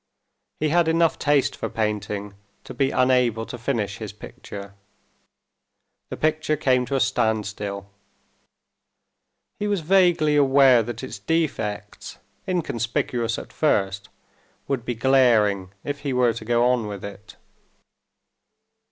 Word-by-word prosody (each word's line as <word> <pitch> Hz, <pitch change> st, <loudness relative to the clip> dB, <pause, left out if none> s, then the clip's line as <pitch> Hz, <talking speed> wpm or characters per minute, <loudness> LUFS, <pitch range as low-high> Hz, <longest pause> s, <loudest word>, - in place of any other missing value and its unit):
He 155 Hz, -, +1 dB
had 170 Hz, +1 st, +3 dB
enough 165 Hz, 0 st, +2 dB
taste 145 Hz, -2 st, +2 dB
for -, -, -4 dB
painting 105 Hz, -2 st, -3 dB, 0.3 s
to -, -, -9 dB
be 135 Hz, -1 st, +1 dB
unable 125 Hz, -4 st, +2 dB
to -, -, -7 dB
finish 115 Hz, -5 st, -2 dB
his 110 Hz, -3 st, -6 dB
picture. 100 Hz, -1 st, -10 dB, 1.4 s
The -, -, -6 dB
picture 155 Hz, 0 st, 0 dB
came 130 Hz, -3 st, +2 dB
to 135 Hz, -, -2 dB
a -, -, +2 dB
standstill. 105 Hz, -4 st, -1 dB, 1.7 s
He 210 Hz, -, -1 dB
was 200 Hz, -4 st, 0 dB
vaguely 170 Hz, -3 st, +3 dB
aware 135 Hz, -3 st, +5 dB
that 120 Hz, +2 st, -6 dB
its 130 Hz, -, -7 dB
defects, 105 Hz, -, -3 dB, 0.3 s
inconspicuous 125 Hz, -, -1 dB
at -, -, -9 dB
first, 100 Hz, -9 st, 0 dB, 0.6 s
would 130 Hz, -4 st, -2 dB
be 120 Hz, -, -2 dB
glaring 110 Hz, -7 st, +3 dB
if 145 Hz, 0 st, -4 dB
he 140 Hz, -2 st, -3 dB
were 125 Hz, -2 st, +3 dB
to 110 Hz, 0 st, -8 dB
go 120 Hz, +1 st, +2 dB
on 120 Hz, -4 st, -1 dB
with 100 Hz, -2 st, -6 dB
it. 100 Hz, +1 st, -11 dB
120 Hz, 125 wpm, -23 LUFS, 105-145 Hz, 1.7 s, aware